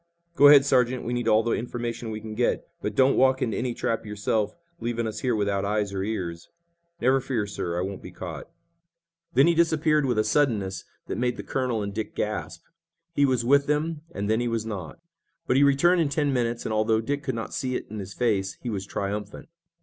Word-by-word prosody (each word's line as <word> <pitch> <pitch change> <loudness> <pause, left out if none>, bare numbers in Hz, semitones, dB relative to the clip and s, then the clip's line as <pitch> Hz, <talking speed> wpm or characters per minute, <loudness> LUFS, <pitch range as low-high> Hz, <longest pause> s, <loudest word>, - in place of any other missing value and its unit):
"Go 145 -3 +8
ahead, 145 -1 +8
Sergeant. 125 -2 +2
We 120 - -2
need 120 -1 -2
all 110 0 +4
the 115 - -1
information 120 0 -3
we 110 -1 -4
can 110 0 -7
get, 120 +3 0
but 105 0 -3
don't 135 +1 +4
walk 130 0 +4
into 115 -4 -1
any 120 -1 -2
trap 115 - -1
yourself, 105 0 -1 0.2
leaving 115 0 -2
us 110 - -4
here 125 -3 0
without 100 -2 0
eyes 105 0 -1
or 95 - -2
ears." 90 -5 -4 0.5
"Never 130 +2 +3
fear, 120 -5 -1
sir. 90 -4 -4
I 90 - 0
won't 95 0 -5
be - - -9
caught." - - -8 0.9
Then 135 - +6
he 170 - +4
disappeared 155 -3 +2
with 120 -3 0
a 110 - +3
suddenness 110 -7 0 0.2
that - - -4
made 125 0 0
the - - -6
colonel 125 -5 -1
and 100 0 -4
Dick 110 +1 -4
gasp. 85 -6 -3 0.5
He 145 -3 +3
was 125 -3 +1
with 140 +2 +4
them, 150 +1 0
and 100 -7 -3
then 110 +2 +2
he 120 - 0
was 115 -2 -1
not. 100 -7 -6 0.5
But 125 - +1
he 140 - +5
returned 170 +6 +4
in 155 - +1
ten 145 0 0
minutes, 120 -2 -1
and, 110 - -1
although 110 +1 +2
Dick 140 +6 -2
could 130 -4 -3
not 115 - -5
see 130 -1 -2
it - - -3
in 110 - -5
his 100 0 -7
face, 100 -6 0
he 120 - -2
was 100 -2 -4
triumphant. 100 +4 -4
115 Hz, 220 wpm, -26 LUFS, 105-130 Hz, 0.9 s, Go